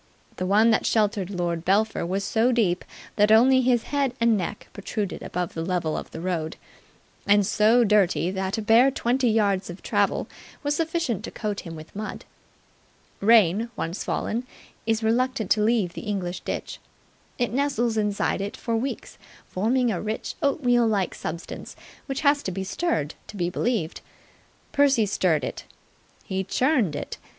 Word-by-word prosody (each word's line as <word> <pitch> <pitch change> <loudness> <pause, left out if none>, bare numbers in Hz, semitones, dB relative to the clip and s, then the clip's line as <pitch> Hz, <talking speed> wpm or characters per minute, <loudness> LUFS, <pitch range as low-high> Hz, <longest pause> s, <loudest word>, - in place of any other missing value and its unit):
The 185 - -2
one 215 +4 +5
that 220 - +2
sheltered 205 -4 +1
Lord 175 -3 -2
Belpher 210 +5 +1
was 195 +3 -1
so 225 +5 +2
deep 205 -8 +1 0.3
that 210 0 +4
only 260 +4 +6
his 245 -2 +2
head 275 -3 +1
and 230 -1 +4
neck 200 +2 -4
protruded 200 0 -4
above 180 -1 -3
the 165 - -3
level 175 -3 -1
of - - -5
the - - -8
road, 170 -3 -2 0.7
and 205 0 +5
so 220 +4 +4
dirty 195 -4 +2
that 190 +2 -2
a 220 - -3
bare 230 +5 +6
twenty 255 -1 +1
yards 200 -4 +1
of 175 +2 -9
travel - - +1 0.4
was 290 0 0
sufficient 325 - -1
to - - -5
coat 210 -2 -4
him 165 -2 -8
with 155 +3 -12
mud. 215 +1 -6 0.9
Rain, 215 0 +4
once 170 +5 -3
fallen, 240 +3 -2 0.4
is 225 0 +1
reluctant 230 -2 0
to 215 - +4
leave 210 -5 +2
the - - -6
English 185 -4 -3
ditch. - - -5 0.6
It 245 -2 -1
nestles 245 -4 0
inside 210 -2 0
it 200 +1 -4
for 230 -2 -2
weeks, 260 +4 -4 0.3
forming 235 +5 +1
a 180 - -2
rich, 215 +1 -4
oatmeal 245 -5 +2
like 200 -4 0
substance 165 +2 -7 0.3
which 270 0 -3
has 285 -1 +3
to 190 - -3
be 190 +1 -3
stirred 185 - -1
to 210 - -9
be 175 -1 -1
believed. 220 -7 -1 0.7
Percy 275 -6 +4
stirred 175 -7 +1
it. - - -5 0.6
He 190 0 -2
churned 240 - +1
it. - - -6
215 Hz, 165 wpm, -25 LUFS, 185-240 Hz, 0.9 s, only